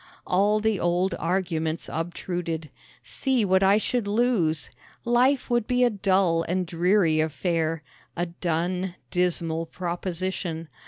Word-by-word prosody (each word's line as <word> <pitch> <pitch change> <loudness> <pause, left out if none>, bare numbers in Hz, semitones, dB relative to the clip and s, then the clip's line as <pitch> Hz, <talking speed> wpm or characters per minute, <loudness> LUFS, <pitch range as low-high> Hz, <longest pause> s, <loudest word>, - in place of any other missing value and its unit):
All 205 +3 +2
the 215 -2 +1
old 175 +2 +1
arguments 165 -3 -1
obtruded. 165 -1 -4 0.3
See 260 -5 0
what 190 0 +3
I 195 +1 +5
should 225 0 -1
lose! 205 - +1 0.3
Life 250 +3 +3
would 240 -2 +1
be 250 0 +2
a 245 - +4
dull 190 -4 +2
and 180 +1 0
dreary 175 -1 +2
affair 160 +1 -1 0.3
a 175 - 0
dun, 175 +2 -2 0.2
dismal 165 -2 0
proposition. 175 -2 -4
180 Hz, 120 wpm, -25 LUFS, 165-205 Hz, 0.3 s, I